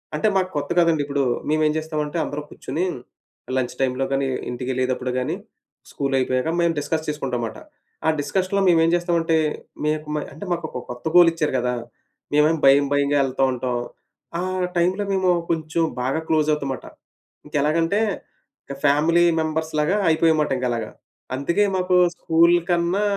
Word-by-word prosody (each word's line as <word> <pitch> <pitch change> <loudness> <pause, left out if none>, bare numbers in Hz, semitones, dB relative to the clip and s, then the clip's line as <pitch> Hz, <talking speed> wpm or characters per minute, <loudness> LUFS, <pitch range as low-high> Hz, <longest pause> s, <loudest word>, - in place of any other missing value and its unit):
అంటే, 155 - +1
మాకు 185 -1 0
కొత్త 145 +3 -3
కదండిప్పుడు, 145 -4 +2 0.3
మేమేం 155 0 +2
చేస్తామంటే, 155 0 -3
అందరూ 145 +1 -4
కుర్చుని 155 +7 -4 0.7
లంచ్ 125 -1 -2
టైమ్‌లో 130 0 0
గానీ, 135 0 +1 0.2
ఇంటికెళ్ళేదప్పుడు 130 +1 -2
గానీ, 125 - -2 0.6
స్కూలయిపోయాక 135 +1 0
మేం 170 -1 +3
డిస్కస్ 155 +2 -2
చేసుకుంటాం 135 -5 -2
మాట. - - -7 0.5
ఆ - - +5
డిస్కషన్‌లో 185 +7 0
మేమేం 165 -1 +4
చేస్తామంటే, 170 -2 +1 0.5
మేక్ 155 0 -1
మై - - -2
అంటే, 200 - -8
మాకొక 160 -7 -5
కొత్త 125 +4 -10
గోలిచ్చారు 165 -4 +5
గదా! 125 0 -1 0.6
మేవేమో 155 +2 +3
భయం 140 +1 +6
భయంగా 145 0 +2
యెళ్తా 135 0 0
ఉంటాం. 125 0 -2 0.6
ఆ - - -2 0.3
టైమ్‌లో 185 +4 +1
మేము 190 -1 +2 0.2
కొంచుం 160 0 0 0.2
బాగా 135 +6 -1
క్లోజవుతమాట. 150 -4 0 0.6
ఇంకెలాగంటే, 160 +7 +1 0.6
ఇక 140 - -7
ఫ్యామిలీ 160 +5 +4 0.2
మెంబర్స్‌లాగా 160 +3 0
అయిపోయాం 160 0 +3
మాట 150 - -1
ఇంకలాగా. 120 -3 -2 0.4
అందుకే 170 +9 +1
మాకూ 185 0 +1 0.2
స్కూల్ 170 +1 +4
కన్నా 175 +3 +1
155 Hz, 130 wpm, -22 LUFS, 135-170 Hz, 0.7 s, భయం